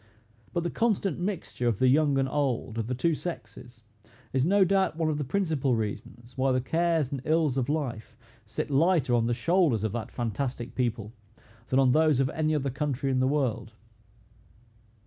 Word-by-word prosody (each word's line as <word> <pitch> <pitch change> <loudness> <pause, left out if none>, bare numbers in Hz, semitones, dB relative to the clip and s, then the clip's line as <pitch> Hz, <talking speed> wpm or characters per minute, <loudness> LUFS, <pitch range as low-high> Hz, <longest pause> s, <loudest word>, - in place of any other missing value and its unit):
But 170 - -1
the 175 - -2
constant 200 -7 0
mixture 175 -9 -3
of 115 -4 +1
the 130 - +3
young 140 +1 +3
and 135 0 +1
old, 130 -5 -1
of 115 - -2
the 125 - -2
two 165 +7 +1
sexes, 120 - -7 0.5
is 130 +3 +2
no 200 +1 +5
doubt 190 -3 +1
one 160 -1 +1
of 150 - -2
the - - -1
principal 145 -5 0
reasons 115 +2 -5
why 130 0 +1
the 130 - +2
cares 160 +1 0
and 140 -3 -3
ills 155 -3 +1
of 130 0 -1
life 125 -6 -3 0.3
sit 110 +7 -5
lighter 150 -2 +3
on 115 -1 +2
the 120 - 0
shoulders 155 - +2
of 110 - -1
that 120 -1 -4
fantastic 120 +1 -4
people, 115 -4 -2 0.5
than 130 - +1
on 135 -2 +5
those 155 -1 +3
of 135 -1 +1
any 155 0 0
other 140 -2 -1
country 140 -1 -2
in 130 - +1
the 130 - +2
world. 130 -6 -1
135 Hz, 185 wpm, -27 LUFS, 120-160 Hz, 0.5 s, no